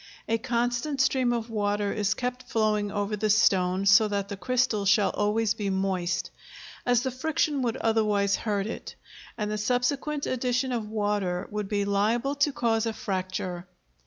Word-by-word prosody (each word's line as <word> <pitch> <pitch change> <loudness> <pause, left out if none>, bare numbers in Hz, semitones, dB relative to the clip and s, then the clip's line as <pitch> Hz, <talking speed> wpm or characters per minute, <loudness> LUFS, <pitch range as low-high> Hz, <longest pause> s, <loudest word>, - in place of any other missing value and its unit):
A 225 0 +1
constant 245 +4 -1
stream 260 -2 +2
of 235 -1 -2
water 205 -1 0
is 210 0 0
kept 250 0 -4
flowing 210 -2 +1
over 205 +1 -1
the 215 +1 -1
stone 190 -3 +3
so 205 +3 +6
that 200 -1 -2
the 200 - -4
crystal 215 +1 0
shall 200 +1 +3
always 210 +1 +1
be 205 -2 -3
moist, 190 -2 -1 0.6
as 245 -1 +3
the 260 - -1
friction 290 +1 0
would 235 -3 -1
otherwise 210 -3 +2
hurt 205 -3 -1
it, 225 - -6 0.4
and 210 -1 -2
the 215 - -2
subsequent 270 +6 0
addition 255 +1 0
of 225 -4 -3
water 205 -4 -1
would 210 -1 -3
be 205 -1 0
liable 220 +7 +1
to 285 +1 +2
cause 230 -3 0
a 225 - -1
fracture. 185 -2 -4
215 Hz, 165 wpm, -27 LUFS, 200-245 Hz, 0.6 s, so